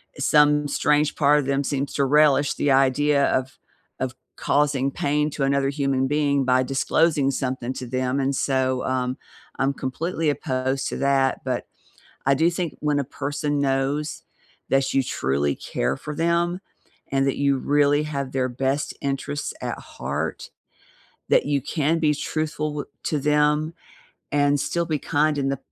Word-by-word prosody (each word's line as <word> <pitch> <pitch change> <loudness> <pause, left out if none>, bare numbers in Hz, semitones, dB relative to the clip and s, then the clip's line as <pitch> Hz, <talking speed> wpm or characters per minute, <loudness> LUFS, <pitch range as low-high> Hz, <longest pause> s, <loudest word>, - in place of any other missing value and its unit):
eh, - - -14
some 150 +1 +4
strange 150 +1 +1
part 150 0 +4
of 140 - -3
them 140 +1 +1
seems 140 0 -2
to 140 - +2
relish 145 0 +4
the 145 - 0
idea 140 +2 +3
of 130 +1 -1 0.4
of 130 -1 -2 0.2
causing 140 -2 +1
pain 150 +2 0
to 140 - -6
another 140 0 +1
human 135 -2 0
being 140 -1 +1
by 130 0 +3
disclosing 140 +2 +2
something 130 -1 -3
to 125 - -6
them 130 +2 -1
and 135 0 0
so, 130 -2 0
um, 130 0 -1 0.4
I'm 135 +1 +1
completely 160 +5 -2
opposed 130 -1 -1
to - - -4
that, 135 -1 +2
but - - -2 0.6
I 135 +1 +4
do 165 +4 +3
think 175 -2 -4
when 150 -1 +1
a - - 0
person 145 +1 -3
knows 140 +2 -1 0.5
that 135 0 +2
you 135 - +3
truly 70 - -1
care 65 +3 -2
for 150 - -7
them 170 +3 0 0.5
and 135 0 +2
that 135 - +1
you 140 -1 +2
really 145 +2 +2
have 140 -3 -4
their 130 -1 0
best 135 +3 -1
interests 140 +1 -3
at - - -3
heart, - - -5 0.8
that - - +4
you 145 -1 +1
can 160 +1 0
be 150 -2 +2
truthful 155 +1 -2
w 145 - -3 0.2
to 150 - -1
them 150 +2 +2 0.6
and 145 0 +2
still 170 +3 -1
be 155 -3 -1
kind 150 -1 +1
in 135 0 0
the 135 - -1
140 Hz, 165 wpm, -23 LUFS, 135-150 Hz, 0.8 s, some